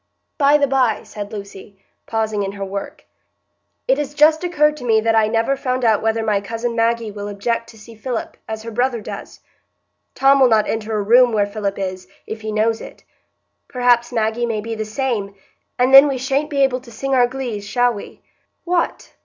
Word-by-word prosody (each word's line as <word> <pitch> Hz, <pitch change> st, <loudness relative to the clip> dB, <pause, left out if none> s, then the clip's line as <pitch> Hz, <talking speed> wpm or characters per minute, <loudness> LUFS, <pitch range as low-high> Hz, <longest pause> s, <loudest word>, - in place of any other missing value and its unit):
"By 285 Hz, +1 st, +5 dB
the 285 Hz, -, +2 dB
by," 260 Hz, -5 st, +1 dB
said 205 Hz, -1 st, -8 dB
Lucy, 200 Hz, -1 st, -10 dB, 0.3 s
pausing 220 Hz, -2 st, -1 dB
in 195 Hz, 0 st, -3 dB
her 200 Hz, -1 st, -5 dB
work, 195 Hz, +1 st, -7 dB, 0.8 s
"it -, -, +2 dB
has 290 Hz, 0 st, -4 dB
just 310 Hz, +3 st, +4 dB
occurred 300 Hz, -4 st, +2 dB
to 265 Hz, -, -10 dB
me 225 Hz, -2 st, +3 dB
that 225 Hz, +1 st, +1 dB
I 220 Hz, -1 st, +4 dB
never 230 Hz, +4 st, +1 dB
found 255 Hz, -2 st, -2 dB
out 220 Hz, -2 st, +3 dB
whether 225 Hz, 0 st, 0 dB
my 210 Hz, -2 st, +1 dB
cousin 230 Hz, +3 st, -4 dB
Maggie 230 Hz, -1 st, 0 dB
will 205 Hz, 0 st, -6 dB
object 230 Hz, +3 st, -3 dB
to 225 Hz, -, -15 dB
see 225 Hz, +2 st, -13 dB
Philip, 230 Hz, +1 st, -5 dB
as 220 Hz, 0 st, -5 dB
her 230 Hz, -, -7 dB
brother 245 Hz, +1 st, 0 dB
does. 210 Hz, -, -9 dB, 0.7 s
Tom 275 Hz, +1 st, +4 dB
will 260 Hz, -, +6 dB
not 220 Hz, -3 st, +3 dB
enter 220 Hz, 0 st, -2 dB
a 205 Hz, -, -1 dB
room 240 Hz, +3 st, +5 dB
where 205 Hz, -2 st, +2 dB
Philip 200 Hz, -1 st, -4 dB
is, 185 Hz, -1 st, -5 dB, 0.2 s
if 220 Hz, 0 st, -7 dB
he 215 Hz, 0 st, -4 dB
knows 220 Hz, +1 st, 0 dB
it; -, -, -12 dB, 0.6 s
perhaps 245 Hz, -1 st, +2 dB
Maggie 230 Hz, 0 st, 0 dB
may 225 Hz, -2 st, -2 dB
be 225 Hz, +2 st, -5 dB
the 220 Hz, -1 st, -4 dB
same, 215 Hz, -3 st, -3 dB, 0.4 s
and 255 Hz, +2 st, +2 dB
then 275 Hz, +2 st, +10 dB
we 275 Hz, -2 st, -1 dB
sha'n't 270 Hz, +4 st, -1 dB
be 280 Hz, -3 st, +2 dB
able 260 Hz, -1 st, +1 dB
to 245 Hz, -2 st, -15 dB
sing 270 Hz, +5 st, -3 dB
our 250 Hz, -2 st, +4 dB
glees, 245 Hz, -5 st, -5 dB
shall 245 Hz, +4 st, +1 dB
we?" 205 Hz, -, -10 dB, 0.4 s
"What! 350 Hz, -1 st, -2 dB
230 Hz, 205 wpm, -19 LUFS, 215-260 Hz, 0.8 s, then